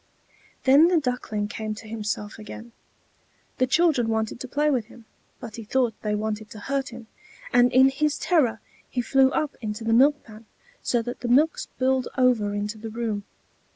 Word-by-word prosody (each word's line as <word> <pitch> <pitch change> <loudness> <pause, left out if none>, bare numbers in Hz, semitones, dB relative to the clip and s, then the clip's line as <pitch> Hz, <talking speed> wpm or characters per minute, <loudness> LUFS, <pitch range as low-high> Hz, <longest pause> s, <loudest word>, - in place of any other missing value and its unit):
Then 280 +5 +6
the 355 -1 +3
Duckling 245 -6 -2
came 215 0 -5
to 220 - -11
himself 210 -1 -4
again. 225 +2 -10 0.9
The 255 - +3
children 295 -4 +3
wanted 220 0 -1
to 260 - -6
play 295 +3 +1
with 245 -6 0
him; 235 0 -16 0.3
but 235 -3 -9
he 230 - -6
thought 240 +1 +1
they 210 -1 -1
wanted 215 0 -3
to 215 - -10
hurt 275 +5 -2
him, 235 -1 -10 0.5
and 245 0 +5
in 260 +1 +6
his 295 +2 0
terror 255 - +1 0.3
he 250 - -1
flew 265 +2 +4
up 295 +1 -2
into 215 0 -4
the 225 0 +1
milk 285 +5 +4
pan, 220 0 -14 0.3
so 240 -2 0
that 245 +1 -6
the 245 - -4
milk 290 +7 +3
spilled 260 0 -1
over 245 -5 +3
into 210 +2 -3
the 225 +1 -6
room. 220 -3 -3
240 Hz, 185 wpm, -25 LUFS, 220-265 Hz, 0.9 s, Then